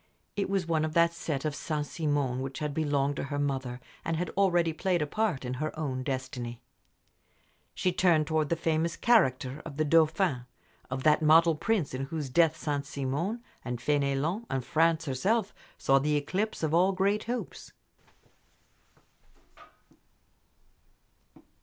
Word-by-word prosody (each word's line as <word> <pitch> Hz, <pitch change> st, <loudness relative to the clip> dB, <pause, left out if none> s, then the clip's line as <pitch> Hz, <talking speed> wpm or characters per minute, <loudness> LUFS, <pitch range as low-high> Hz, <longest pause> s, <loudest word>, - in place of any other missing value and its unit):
It 200 Hz, -1 st, -1 dB
was 195 Hz, -2 st, 0 dB
one 160 Hz, -2 st, +1 dB
of 155 Hz, 0 st, -2 dB
that 170 Hz, 0 st, +4 dB
set 155 Hz, -4 st, -3 dB
of 155 Hz, -, 0 dB
Saint 150 Hz, 0 st, -3 dB
Simon 145 Hz, -5 st, -1 dB
which 135 Hz, 0 st, -5 dB
had 150 Hz, -1 st, -3 dB
belonged 145 Hz, -2 st, 0 dB
to -, -, -2 dB
her 145 Hz, 0 st, -4 dB
mother, 135 Hz, -3 st, -2 dB, 0.2 s
and 165 Hz, -1 st, -1 dB
had 175 Hz, +2 st, -2 dB
already 175 Hz, -4 st, +2 dB
played 180 Hz, +2 st, 0 dB
a 150 Hz, -, 0 dB
part 185 Hz, -5 st, -1 dB
in 125 Hz, -, -3 dB
her 155 Hz, 0 st, -3 dB
own 135 Hz, -5 st, -2 dB
destiny. 130 Hz, -3 st, -4 dB, 1.2 s
She 185 Hz, -, +1 dB
turned 170 Hz, -4 st, +3 dB
to 160 Hz, 0 st, +1 dB
the 150 Hz, +3 st, -1 dB
famous 165 Hz, 0 st, 0 dB
"character" 135 Hz, -, +2 dB
of 145 Hz, -4 st, -9 dB
the 155 Hz, -, +1 dB
Dauphin, 155 Hz, -4 st, +2 dB, 0.4 s
of 130 Hz, 0 st, -4 dB
that 155 Hz, 0 st, +4 dB
model 165 Hz, +2 st, +6 dB
prince, 185 Hz, -, -1 dB
in 130 Hz, +1 st, -3 dB
whose 145 Hz, -2 st, -5 dB
death 165 Hz, +2 st, +3 dB
Saint 145 Hz, -3 st, -2 dB
Simon, 150 Hz, -, -3 dB, 0.2 s
and 125 Hz, -1 st, -3 dB
Fénelon, 145 Hz, -, 0 dB
and 130 Hz, -2 st, -2 dB
France 165 Hz, 0 st, +2 dB
herself, 190 Hz, -, 0 dB, 0.2 s
saw 135 Hz, 0 st, +3 dB
the 150 Hz, +2 st, +1 dB
eclipse 185 Hz, +8 st, -2 dB
of 155 Hz, -1 st, 0 dB
all 185 Hz, +3 st, +4 dB
great 200 Hz, +3 st, +1 dB
hopes. 245 Hz, +1 st, -5 dB
155 Hz, 155 wpm, -29 LUFS, 140-170 Hz, 1.2 s, model